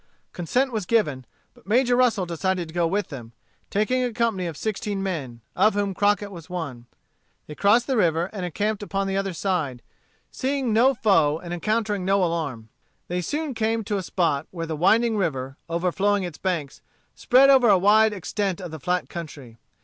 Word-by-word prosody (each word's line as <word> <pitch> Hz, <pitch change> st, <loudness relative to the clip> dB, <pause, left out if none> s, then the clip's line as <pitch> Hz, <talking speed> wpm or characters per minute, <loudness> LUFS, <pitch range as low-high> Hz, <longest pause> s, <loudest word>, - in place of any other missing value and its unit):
Consent 250 Hz, +10 st, 0 dB
was 215 Hz, -6 st, -3 dB
given; 150 Hz, -, +1 dB, 0.3 s
but -, -, -23 dB
Major 245 Hz, +3 st, +3 dB
Russel 240 Hz, -6 st, +2 dB
decided 175 Hz, +1 st, -2 dB
to 160 Hz, -, -12 dB
go 170 Hz, -1 st, +1 dB
with 200 Hz, +4 st, -1 dB
them, 120 Hz, -6 st, -9 dB, 0.4 s
taking 255 Hz, +5 st, +1 dB
a 245 Hz, -, -1 dB
company 225 Hz, -6 st, 0 dB
of 160 Hz, -3 st, -6 dB
sixteen 205 Hz, -2 st, -3 dB
men, 140 Hz, -11 st, -4 dB
of 205 Hz, +3 st, +3 dB
whom 200 Hz, -1 st, 0 dB
Crockett 205 Hz, +1 st, +1 dB
was 170 Hz, -2 st, -11 dB
one. 140 Hz, -10 st, -6 dB, 0.6 s
They 150 Hz, -, -9 dB
crossed 210 Hz, +8 st, +3 dB
the 265 Hz, -, -1 dB
river 170 Hz, -3 st, +2 dB
and 195 Hz, -4 st, -5 dB
encamped 205 Hz, +5 st, -2 dB
upon 195 Hz, -1 st, -2 dB
the 195 Hz, 0 st, -2 dB
other 195 Hz, -1 st, -1 dB
side, 160 Hz, -8 st, -2 dB, 0.5 s
seeing 265 Hz, -3 st, -1 dB
no 255 Hz, +5 st, +4 dB
foe 165 Hz, -10 st, +3 dB
and 175 Hz, +1 st, -7 dB
encountering 210 Hz, +2 st, -1 dB
no 195 Hz, +1 st, +2 dB
alarm. 145 Hz, -10 st, -3 dB, 0.4 s
They 180 Hz, +1 st, -1 dB
soon 295 Hz, -, -3 dB
came 225 Hz, 0 st, 0 dB
to 205 Hz, 0 st, -2 dB
a -, -, -2 dB
spot 165 Hz, -5 st, -1 dB
where 165 Hz, -2 st, -5 dB
the 160 Hz, -1 st, -4 dB
winding 220 Hz, +7 st, +3 dB
river, 135 Hz, -8 st, -2 dB
overflowing 190 Hz, +4 st, +1 dB
its 175 Hz, -4 st, -6 dB
banks, 165 Hz, -7 st, -3 dB, 0.3 s
spread 270 Hz, +2 st, +5 dB
over 255 Hz, -4 st, +5 dB
a 200 Hz, -, +6 dB
wide 215 Hz, +3 st, +5 dB
extent 195 Hz, +1 st, -3 dB
of 180 Hz, -4 st, -7 dB
the 160 Hz, -, -7 dB
flat 180 Hz, +5 st, -1 dB
country. 140 Hz, -9 st, -9 dB
190 Hz, 185 wpm, -24 LUFS, 165-215 Hz, 0.6 s, a